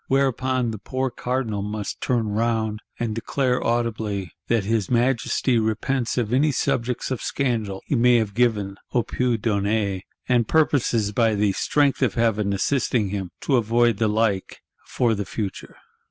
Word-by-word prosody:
Whereupon 130 -2 +1
the 110 - -6
poor 130 +4 -2
Cardinal 125 -6 -2
must 105 0 -4
turn 115 -4 0
round; 110 0 0 0.2
and 115 -2 -1
declare 125 +3 0
audibly; 110 -5 -1 0.2
'That 115 -3 +2
his 105 -1 0
Majesty 120 0 +2
repents 115 +4 -1
of 120 -2 0
any 145 +4 +3
subjects 125 -1 -1
of 130 - -2
scandal 110 -8 -2
he - - -2
may 125 -1 +5
have 110 -3 +1
given 105 -4 +1 0.2
(a 120 - +3
pu 125 -2 0
donner); 100 -2 0 0.3
and 120 -3 +2
purposes, 125 -9 +2
by 110 0 +2
the 105 -1 +2
strength 140 +8 +1
of 120 -7 +1
Heaven 110 -3 +1
assisting 110 +1 +1
him, 95 -2 -3
to 135 - +2
avoid 120 -1 +2
the 110 0 +1
like—for 110 +2 -1
the 100 -1 -2
future! 100 -2 -5
115 Hz, 155 wpm, -23 LUFS, 105-125 Hz, 0.3 s, may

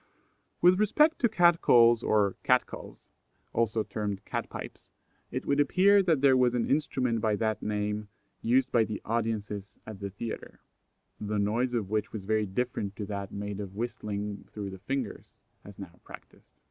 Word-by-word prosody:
With 180 +2 +6
respect 300 +10 +3
to 235 - +3
cat 175 -5 +4
calls 120 -1 +6
or 105 -4 +2
cat - - +3
cals, - - -11 0.5
also 115 -1 +1
termed 105 -2 -4
cat - - -3
pipes, - - -9 0.4
it - - -4
would 140 0 +1
appear 195 +7 +5
that 165 -7 +2
there 135 -2 +6
was 125 -1 +3
an 120 - 0
instrument 130 -5 0
by 110 -2 +2
that 110 0 -1
name 105 0 -2 0.3
used 130 +3 +2
by 115 - +4
the 110 -1 -4
audiences 105 -3 -3
at 110 -3 -8
the 100 -1 -4
theatre, 110 +4 -7 0.6
the 105 0 -2
noise 115 +5 0
of 105 -4 -2
which 110 0 -1
was 110 -3 -5
very 110 +1 0
different 100 -1 -3
to 105 - -5
that 100 -1 -5
made 100 0 -5
by 105 - -3
whistling 105 0 -5
through 100 -2 -5
the 95 - -9
fingers, 130 +1 -5 0.2
as 100 0 -13
now 90 -3 -10
practised. - - -14
110 Hz, 170 wpm, -29 LUFS, 100-125 Hz, 0.6 s, With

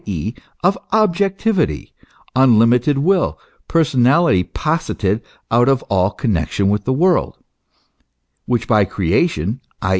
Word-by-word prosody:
e., 100 +3 -4 0.3
of 185 +3 +3 0.2
objectivity, 195 - 0 0.4
unlimited 125 +2 +3
will, 180 +6 +1 0.3
personality 145 - +2
posited 110 - -2 0.3
out 120 +3 +3
of 135 -1 +1
all 95 -1 +2
connexion 100 - -1
with 105 0 -1
the 130 - 0
world, 175 +6 +1 1.1
which 120 -2 -1
by 105 -3 +3
creation, 100 - -1 0.2
i. 95 - -2
125 Hz, 110 wpm, -18 LUFS, 100-165 Hz, 1.1 s, of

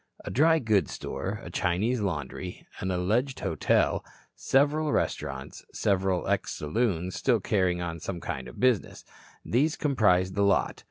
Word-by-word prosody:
A - - -4
dry 160 +4 +4
goods 110 - +1
store, - - -4
a - - -8
Chinese 105 +8 0
laundry, 90 0 -4
an 95 - -2
alleged 110 +9 0
hotel, - - +1 0.3
several 150 +3 +2
restaurants, 65 - -2
several 95 -2 0
ex - - 0
saloons 90 +1 -1
still 120 -4 +2
carrying 90 -3 +1
on 85 -1 -4
some 90 +2 -5
kind 65 -5 -5
of - - -11
business 125 -6 +1 0.4
these 145 +7 +2
comprised 95 - +2
the 100 - 0
lot. 100 -1 +2
95 Hz, 145 wpm, -28 LUFS, 90-125 Hz, 0.4 s, dry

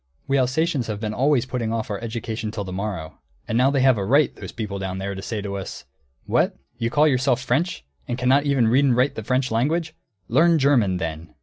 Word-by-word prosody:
We 135 0 +2
Alsatians 135 +1 0
have 105 -2 -3
been 110 -1 -3
always 135 +1 +2
putting 120 -3 -3
off 115 -2 -3
our 100 - -3
education 110 -1 -4
till 105 -1 -4
the 95 -1 -7
morrow; 95 -6 -5 0.3
and 110 - -2
now 125 +3 +4
they 140 -1 +1
have 130 -4 +4
a - - -1
right, 140 +7 +3
those - - -8
people 105 -3 -5
down 95 -1 -4
there, 100 +1 -3
to 95 - -6
say 105 0 -4
to 100 -1 -4
us, 95 - -7 0.4
'What! - - +1 0.2
You 115 - 0
call 150 +5 +4
yourselves 130 -2 +1
French, 140 - -1 0.2
and 120 - -2
cannot 130 +3 +3
even 135 -5 +3
read 130 +5 +4
and 130 -3 +3
write 130 +3 +3
the - - -5
French 125 +3 0
language? 160 +8 0 0.3
Learn 165 +7 +4
German, 125 -10 +3
then!'" 80 -2 -5
120 Hz, 225 wpm, -23 LUFS, 105-135 Hz, 0.4 s, now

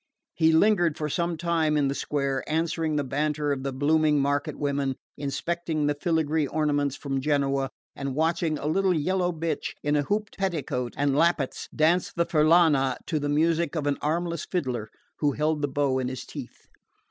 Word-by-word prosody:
He 160 -1 +3
lingered 175 -2 +3
for 150 -1 -2
some 170 +2 -1
time 160 -2 +1
in 145 -2 +2
the 135 - 0
square, 140 -2 -1
answering 160 -1 0
the 145 - +1
banter 150 +2 -1
of 140 -2 -1
the 135 0 -3
blooming 150 +2 +2
market 140 +1 0
women, 140 -2 -1 0.2
inspecting 155 +2 -2
the 145 - +2
filigree 160 -1 0
ornaments 145 -2 0
from 135 -2 -3
Genoa, 140 -2 +1 0.3
and 135 -1 -4
watching 160 0 +1
a 145 - -6
little 185 +4 +2
yellow 180 +3 +1
bitch 165 0 -3
in 145 0 +1
a 145 - +3
hooped 210 +8 -2
petticoat 145 -10 -2
and 140 -1 +1
lappets 160 -3 +1
dance 170 +4 +2
the 170 - 0
furlana 155 -5 +4
to 155 -4 -1
the 145 0 -2
music 165 +3 +1
of 155 -3 -1
an 145 -1 0
armless 170 +1 -1
fiddler 125 - -3 0.3
who 145 -2 +2
held 150 +1 0
the 145 - +1
bow 140 -1 0
in 130 - -1
his 130 -1 -5
teeth. - - -9
150 Hz, 180 wpm, -26 LUFS, 140-165 Hz, 0.3 s, furlana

